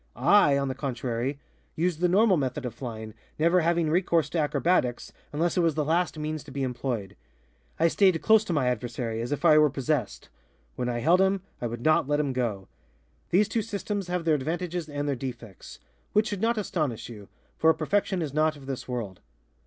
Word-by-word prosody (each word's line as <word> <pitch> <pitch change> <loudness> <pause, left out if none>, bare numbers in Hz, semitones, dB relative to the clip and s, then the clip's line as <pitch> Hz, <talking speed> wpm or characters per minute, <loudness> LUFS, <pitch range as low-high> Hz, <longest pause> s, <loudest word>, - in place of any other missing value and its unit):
I, 145 - +5
on 140 0 -1
the 130 - -2
contrary, 130 -1 -3 0.4
used 170 0 0
the 180 - +3
normal 195 +2 +4
method 135 -2 -2
of 120 - -4
flying, 110 -3 -7 0.2
never 170 +3 +3
having 170 0 +1
recourse 170 -2 +2
to 170 - 0
acrobatics, 150 -4 0 0.2
unless 165 +5 0
it - - +4
was 165 -3 +2
the 155 -2 0
last 170 +2 0
means 155 0 -4
to - - -11
be 140 0 -3
employed. 120 -6 -3 0.6
I 165 - +5
stayed 185 0 +3
close 220 +3 +5
to - - -3
my 145 -6 +1
adversary, 120 -1 -2
as 120 - -4
if 145 - -2
I 155 0 +7
were 150 -1 +5
possessed. 135 -4 -2 0.5
When 125 -1 -2
I 120 -1 -2
held 170 +8 +4
him, 190 0 +2 0.2
I 120 - -1
would 120 +1 -6
not 155 -3 +3
let 145 0 +1
him 145 -3 0
go. 110 -7 -2 0.6
These 195 +4 +3
two 225 +2 -1
systems 205 -2 -4
have 175 -1 -2
their 160 - +3
advantages 165 +3 -2
and 145 0 -3
their 140 - 0
defects, 120 -6 -8 0.4
which 210 +1 +3
should 205 -2 -4
not 230 +1 +1
astonish 155 - -2
you, 105 -4 -11 0.3
for 160 - +6
perfection 185 +2 0
is 145 -3 -5
not 155 +1 +2
of 140 - -13
this 135 -2 -5
world. 115 -7 -5
150 Hz, 200 wpm, -27 LUFS, 125-175 Hz, 0.6 s, I